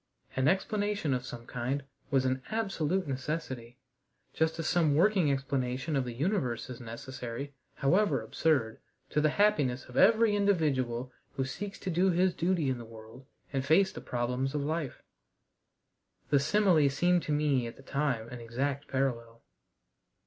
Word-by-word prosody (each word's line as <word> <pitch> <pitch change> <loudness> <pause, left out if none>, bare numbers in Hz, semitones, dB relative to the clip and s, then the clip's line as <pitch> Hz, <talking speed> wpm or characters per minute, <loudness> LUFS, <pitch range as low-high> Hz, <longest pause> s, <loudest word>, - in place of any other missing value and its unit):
An 130 +1 +2
explanation 205 -3 +1
of 125 0 -2
some 120 -1 -8
kind 125 +4 -2 0.3
was 135 -2 +2
an 130 0 0
absolute 195 -5 -1
necessity, 130 -3 -4 0.6
just 160 0 +1
as 165 - -3
some 160 -4 +3
working 180 -2 +4
explanation 135 +1 -1
of 135 -2 +1
the 125 - -4
universe 130 - -1
is 125 - -8
necessary 125 +3 -6 0.2
however 160 0 +2
absurd 115 0 0 0.3
to 150 - +2
the 155 - +4
happiness 145 -10 +2
of 125 - -9
every 220 +1 +5
individual 135 -11 +1 0.2
who 135 - -1
seeks 195 +9 -5
to 185 - -4
do 180 +3 +3
his 180 +1 +3
duty 170 -3 +1
in 130 -2 -1
the - - -7
world 115 +3 -13 0.3
and 135 -1 0
face 175 +7 +4
the - - -8
problems 125 +3 -2
of 145 - 0
life. 155 -2 -3 1.3
The 140 - +5
simile 160 -1 +4
seemed 175 +6 +2
to 155 - -4
me 145 -5 +2
at 115 - -8
the 135 - -14
time 135 -5 -1
an 125 - -7
exact 135 +5 -2
parallel. 115 -4 -2
140 Hz, 155 wpm, -30 LUFS, 125-170 Hz, 1.3 s, every